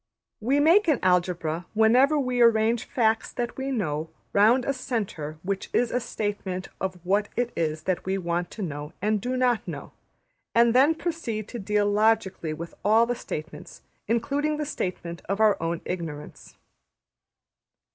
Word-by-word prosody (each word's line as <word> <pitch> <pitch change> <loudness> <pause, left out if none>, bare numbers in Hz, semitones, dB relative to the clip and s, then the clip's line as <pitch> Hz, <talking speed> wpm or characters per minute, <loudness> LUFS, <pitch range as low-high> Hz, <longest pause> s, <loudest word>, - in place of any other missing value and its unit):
We 265 +6 +1
make 345 +7 +5
an 305 -5 +4
Algebra 180 -2 +1
whenever 250 +7 +5
we 255 -3 0
arrange 230 0 +4
facts 225 -2 +1
that 240 -2 -3
we 270 0 -3
know 160 - -2 0.2
round 230 +5 +4
a 275 - +1
centre 200 - -4
which 195 +1 -3
is 240 -1 +2
a 245 - +1
statement 205 -5 -4
of 190 -1 -2
what 200 +3 +1
it 245 0 -1
is 155 -2 -1
that 185 -2 -1
we 190 +1 -1
want 175 -1 -2
to 215 - -6
know 150 -2 -5
and 210 0 0
do 255 +3 -2
not 250 -3 +1
know; - - -7 0.6
and 235 0 +5
then 280 +6 +5
proceed 315 - -3
to 240 - -6
deal 205 0 +1
logically 205 -5 +1
with 170 +2 -6
all 220 +3 +5
the 245 - -1
statements, 160 -9 -8 0.2
including 280 +7 0
the 300 - -2
statement 175 - -4
of 195 +1 -1
our 215 -2 +5
own 165 0 -2
ignorance. 165 -5 -6
215 Hz, 160 wpm, -26 LUFS, 180-245 Hz, 0.6 s, make